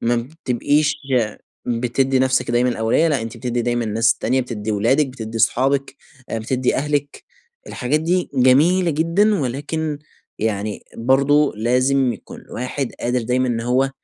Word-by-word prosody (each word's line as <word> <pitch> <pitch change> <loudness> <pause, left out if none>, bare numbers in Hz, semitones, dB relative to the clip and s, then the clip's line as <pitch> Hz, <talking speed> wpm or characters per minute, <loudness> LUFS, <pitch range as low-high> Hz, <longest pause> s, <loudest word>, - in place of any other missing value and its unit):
ما 120 +1 +1
بتبقيش 145 +3 0 0.2
يا 115 -5 0 0.3
بتدّي 125 +3 0
نفسِك 130 -2 +1
دايمًا 120 +1 +2
الأولوية، 120 +7 +2
لأ 145 -6 0
أنتِ 115 +1 -7
بتدّي 120 +1 -2
دايمًا 120 0 0
الناس 110 +1 +2
التانية، 130 +3 0
بتدّي 110 -4 -4
ولادِك، 125 +8 +2
بتدّي 115 -3 -6
صحابِك، 135 +5 +1 0.3
آآ، 115 - -2
بتدّي 125 +3 -1
أهلِك، 145 0 -2 0.4
الحاجات 140 +4 -1
دي 175 +3 0
جميلة 150 +8 +4
جدًا، 170 +6 +2
ولكن 145 +4 -3 0.4
يعني 105 -1 -2
برضه 140 +4 +3
لازم 125 +3 +2
يكون - - -11
الواحد 125 +1 -4
قادر 120 +1 0
دايمًا 125 +2 0
إن 115 -2 -1
هو 125 +3 +1
130 Hz, 145 wpm, -20 LUFS, 120-145 Hz, 0.4 s, جميلة